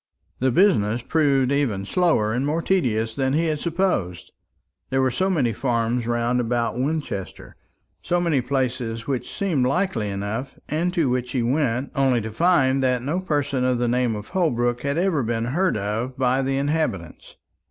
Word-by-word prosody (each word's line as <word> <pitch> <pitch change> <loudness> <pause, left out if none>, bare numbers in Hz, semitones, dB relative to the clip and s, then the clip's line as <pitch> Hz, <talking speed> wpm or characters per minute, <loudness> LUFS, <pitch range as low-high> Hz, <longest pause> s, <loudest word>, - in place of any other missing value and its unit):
The 130 - +2
business 120 - +3
proved 140 -3 +2
even 120 -9 0
slower 110 - +2
and 125 +3 0
more 155 +4 -1
tedious 115 - 0
than 130 +2 0
he 165 +3 +2
had 155 -2 -1
supposed; 165 - -1 0.6
there 135 - 0
were 130 -1 +2
so 185 +10 0
many 135 -11 +1
farms 120 0 -1
round 120 +1 +1
about 120 0 -1
Winchester, 130 - -4 0.5
so 175 - 0
many 165 -6 +1
places 125 -3 -2
which 130 -1 -3
seemed 160 -11 0
likely 135 - 0
enough, 100 +7 -4
and 170 +4 0
to 165 -6 +2
which 125 0 -1
he 125 -3 0
went, 130 0 0
only 135 -4 +2
to 110 0 -5
find 135 -2 +3
that 125 -2 +1
no 155 +7 -1
person 145 -7 -1
of 125 -1 +2
the 120 0 0
name 120 -1 +1
of 105 0 -7
Holbrook 120 -10 0
had 140 +2 -1
ever 175 -4 +1
been 115 -1 -1
heard 170 - 0
of 110 +6 -3
by 130 0 +2
the 135 0 -1
inhabitants. 140 - -2
130 Hz, 175 wpm, -23 LUFS, 120-155 Hz, 0.6 s, business